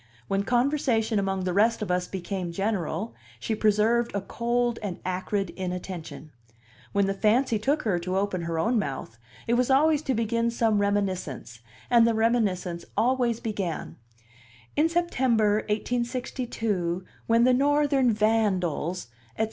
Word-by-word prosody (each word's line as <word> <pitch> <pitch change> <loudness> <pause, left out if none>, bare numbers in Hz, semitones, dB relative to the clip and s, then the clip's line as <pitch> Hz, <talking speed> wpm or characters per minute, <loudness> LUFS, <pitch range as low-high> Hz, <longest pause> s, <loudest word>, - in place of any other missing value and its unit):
When 195 0 +1
conversation 240 -2 +1
among 195 -1 -1
the 180 -1 -1
rest 220 +3 +3
of 195 - -3
us 180 0 0
became 185 -1 -4
general, 200 +2 -2 0.3
she 225 - -2
preserved 220 +3 +2
a 200 - 0
cold 240 +3 -1
and 200 -5 -4
acrid 185 +1 -2
inattention; 180 -5 -6 0.6
when 200 -1 +2
the 195 - 0
fancy 220 +3 +2
took 285 +7 0
her 195 -6 +1
to 185 +2 -2
open 195 -2 -1
her 165 -1 -3
own 225 +8 +2
mouth, 135 - -5 0.3
it 235 - 0
was 250 +1 +2
always 295 +2 +4
to 265 -4 -1
begin 230 +1 0
some 225 -3 +1
reminiscence, 185 - -2 0.3
and 235 -1 +5
the 230 - +2
reminiscence 200 -7 0
always 245 -2 +2
began: 200 -7 -4 0.8
"In 310 +2 +3
September, 255 -11 +2
1862, 225 -6 -2 0.2
when 230 +1 +4
the 255 +1 +5
Northern 280 -1 +3
vandals," 195 -6 0 0.3
etc. - - -18
215 Hz, 140 wpm, -26 LUFS, 185-240 Hz, 0.8 s, and